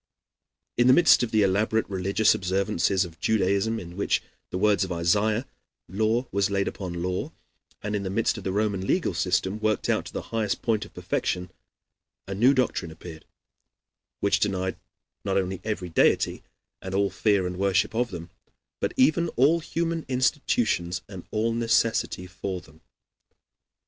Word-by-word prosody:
In 120 Hz, +1 st, +4 dB
the 130 Hz, -, +8 dB
midst 170 Hz, +3 st, +6 dB
of 120 Hz, -, 0 dB
the 110 Hz, -1 st, +3 dB
elaborate 105 Hz, +3 st, +1 dB
religious 100 Hz, +3 st, +2 dB
observances 95 Hz, -1 st, 0 dB
of 85 Hz, -1 st, -12 dB
Judaism, 105 Hz, +1 st, +1 dB
in 85 Hz, -2 st, -9 dB
which, 100 Hz, -, +1 dB
in -, -, -28 dB, 0.2 s
the -, -, -3 dB
words 105 Hz, +1 st, +3 dB
of 95 Hz, -, -4 dB
Isaiah, 105 Hz, +8 st, +1 dB, 0.4 s
law 110 Hz, +6 st, 0 dB
was 100 Hz, 0 st, +1 dB
laid 100 Hz, 0 st, 0 dB
upon 85 Hz, -3 st, -4 dB
law, 90 Hz, 0 st, -2 dB, 0.5 s
and 105 Hz, 0 st, -2 dB
in 100 Hz, -, -1 dB
the 95 Hz, -, -3 dB
midst 110 Hz, +4 st, +1 dB
of -, -, -11 dB
the 95 Hz, -, -2 dB
Roman 100 Hz, -1 st, -1 dB
legal -, -, +1 dB
system 95 Hz, +3 st, 0 dB
worked 110 Hz, 0 st, 0 dB
out -, -, +1 dB
to -, -, -11 dB
the -, -, -4 dB
highest 110 Hz, -3 st, -1 dB
point 110 Hz, -2 st, 0 dB
of -, -, -16 dB
perfection, 90 Hz, 0 st, -2 dB, 0.8 s
a 95 Hz, -, -4 dB
new 120 Hz, +7 st, +5 dB
doctrine 125 Hz, -10 st, 0 dB
appeared, 80 Hz, 0 st, -11 dB, 1.0 s
which 100 Hz, 0 st, +2 dB
denied 95 Hz, -2 st, -1 dB, 0.4 s
not 95 Hz, -1 st, 0 dB
only 95 Hz, -1 st, -2 dB
every 105 Hz, -5 st, -3 dB
deity, 80 Hz, -, +2 dB, 0.4 s
and 95 Hz, 0 st, -5 dB
all 100 Hz, 0 st, +2 dB
fear 100 Hz, -4 st, +2 dB
and 90 Hz, 0 st, -4 dB
worship 100 Hz, +1 st, +2 dB
of 120 Hz, +2 st, 0 dB
them, 85 Hz, -1 st, -8 dB, 0.5 s
but -, -, -2 dB
even 160 Hz, +6 st, +3 dB
all 145 Hz, +7 st, +4 dB
human 165 Hz, 0 st, -2 dB
institutions 125 Hz, -, 0 dB
and 95 Hz, -3 st, -10 dB
all 110 Hz, +2 st, 0 dB
necessity 115 Hz, -4 st, +1 dB
for 95 Hz, 0 st, -5 dB
them. 80 Hz, -3 st, -19 dB
100 Hz, 165 wpm, -26 LUFS, 95-110 Hz, 1.0 s, the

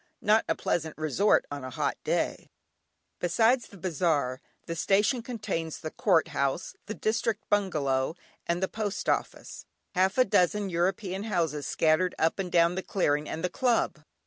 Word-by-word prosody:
Not 215 Hz, +2 st, +4 dB
a -, -, +2 dB
pleasant 160 Hz, -2 st, -2 dB
resort 155 Hz, +7 st, +2 dB
on 145 Hz, -2 st, -5 dB
a 130 Hz, -, -5 dB
hot -, -, -1 dB
day. -, -, -1 dB, 0.7 s
Besides 225 Hz, +8 st, +2 dB
the 200 Hz, -, -14 dB
bazaar, 160 Hz, -7 st, 0 dB, 0.2 s
the 165 Hz, -, -4 dB
station 205 Hz, +8 st, +2 dB
contains 210 Hz, -9 st, -4 dB
the 155 Hz, -, -6 dB
Court 175 Hz, -7 st, +2 dB
House, 140 Hz, +5 st, -1 dB
the 215 Hz, -, -4 dB
District 220 Hz, -1 st, -1 dB
Bungalow, 155 Hz, -8 st, +1 dB, 0.3 s
and 170 Hz, +2 st, 0 dB
the -, -, +2 dB
Post 210 Hz, -1 st, -4 dB
Office; -, -, -2 dB, 0.3 s
half 190 Hz, +3 st, +2 dB
a 255 Hz, -, +6 dB
dozen 195 Hz, +1 st, +2 dB
European 190 Hz, +3 st, -1 dB
houses 165 Hz, -8 st, -1 dB
scattered 165 Hz, +3 st, +2 dB
up 160 Hz, +4 st, +1 dB
and 185 Hz, -2 st, -3 dB
down 170 Hz, 0 st, +4 dB
the 190 Hz, -, -2 dB
clearing, 150 Hz, -7 st, 0 dB
and 165 Hz, -, -4 dB
the 180 Hz, -, +1 dB
club. 240 Hz, -, +1 dB
180 Hz, 160 wpm, -28 LUFS, 160-205 Hz, 0.7 s, a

